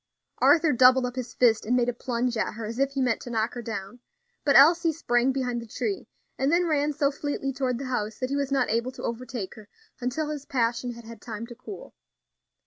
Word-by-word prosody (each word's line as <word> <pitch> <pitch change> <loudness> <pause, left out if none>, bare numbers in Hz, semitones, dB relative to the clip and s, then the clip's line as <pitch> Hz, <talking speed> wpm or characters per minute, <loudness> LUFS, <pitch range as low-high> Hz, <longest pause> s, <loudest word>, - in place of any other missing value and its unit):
Arthur 325 -2 +5
doubled 255 +1 +6
up 250 0 -4
his 255 -2 -5
fist, 230 -3 +4
and 245 +3 +1
made 245 -1 +2
a 245 - 0
plunge 245 0 -2
at 220 - -1
her 225 0 -5
as 230 +3 -5
if 275 0 +1
he 275 - -1
meant 250 -3 0
to - - -8
knock 225 0 -1
her 240 - -5
down; 215 0 -6 0.4
but 280 - +3
Elsie 330 +4 +7
sprang 255 -5 +1
behind 250 -3 -2
the 230 - -10
tree, 390 - -3 0.3
and 270 +2 +2
then 350 +1 +3
ran 300 -2 +1
so 285 -1 +1
fleetly 280 -1 -3
toward 255 -2 -1
the 275 - -5
house 220 -4 -2
that 255 +1 -3
he - - 0
was 280 -1 -1
not 275 - +2
able 235 +3 0
to - - -10
overtake 235 -3 -4
her 215 -1 -14 0.3
until 285 +5 -2
his 295 -2 -5
passion 240 -1 0
had 235 -1 -12
had 225 -2 -11
time 230 -1 -6
to 240 - -10
cool. 220 -6 -10
250 Hz, 230 wpm, -26 LUFS, 235-275 Hz, 0.4 s, Elsie